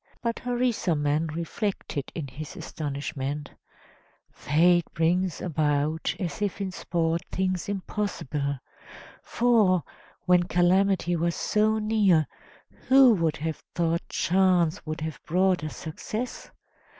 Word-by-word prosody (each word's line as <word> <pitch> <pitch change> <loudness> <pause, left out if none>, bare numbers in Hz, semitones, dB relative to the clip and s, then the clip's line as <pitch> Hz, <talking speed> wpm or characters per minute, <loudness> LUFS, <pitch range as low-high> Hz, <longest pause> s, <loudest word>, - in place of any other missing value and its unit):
But 230 -1 -1
Harisarman 175 -12 0
reflected 170 -4 -3
in 155 -4 -4
his 140 +3 -8
astonishment: 145 -1 -4 0.8
"Fate 175 +4 +3
brings 175 +2 +1
about, 155 -1 0
as 180 +3 -4
if 205 -1 -1
in 195 -2 -2
sport, 170 -2 -1
things 185 -1 -1
impossible; 180 -8 -3 0.6
for, 215 -7 +3 0.4
when 180 -1 +5
calamity 180 0 +2
was 170 0 0
so 215 +1 +1
near, 210 -7 +3 0.6
who 260 -2 +7
would 165 -6 0
have 160 0 -4
thought 170 0 +1
chance 180 -1 +2
would 155 +1 -4
have 160 -1 -5
brought 185 -1 +2
us 155 - -5
success? 215 +9 -5
175 Hz, 110 wpm, -26 LUFS, 155-195 Hz, 0.8 s, who